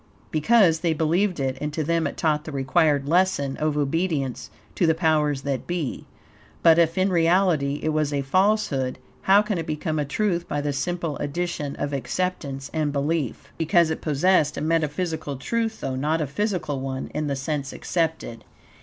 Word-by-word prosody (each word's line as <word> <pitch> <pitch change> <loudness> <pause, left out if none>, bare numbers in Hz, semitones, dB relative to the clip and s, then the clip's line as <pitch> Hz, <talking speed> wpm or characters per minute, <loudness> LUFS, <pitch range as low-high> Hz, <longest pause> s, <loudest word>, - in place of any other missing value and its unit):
Because 165 +1 +4
they 165 -1 +1
believed 170 +4 +1
it, 130 -1 -2
and 150 0 -2
to 155 - -1
them 165 +2 +1
it - - -7
taught 150 -2 0
the 155 - -6
required 140 +1 +2
lesson 160 -5 +2
of 155 -1 0
obedience 145 -3 -1 0.2
to 175 - +1
the 160 - +3
powers 150 -4 +1
that 140 -2 -3
be. 175 -6 -3 0.6
But 165 0 +7
if 165 +1 +2
in 190 +1 +2
reality 165 -4 +2
it 155 - +1
was 155 -1 0
a 140 -1 -1
falsehood, 185 -5 +1 0.2
how 200 +2 +5
can 210 -4 -2
it 165 - -5
become 155 0 -2
a - - +1
truth 175 +3 -1
by 145 - -2
the 145 0 -1
simple 165 +1 -2
addition 150 -1 -3
of 145 - -3
acceptance 140 -2 -3
and 155 -2 0
belief? 145 -2 -2
Because 165 0 +3
it 160 - -3
possessed 155 0 +2
a - - -3
metaphysical 160 -1 -1
truth, 225 - -2
though 130 - -2
not 150 +5 0
a 155 - 0
physical 165 - -2
one, 130 0 -4
in 150 0 -2
the 140 - -1
sense 135 0 -3
accepted. 160 -9 -2
155 Hz, 180 wpm, -24 LUFS, 140-175 Hz, 0.6 s, But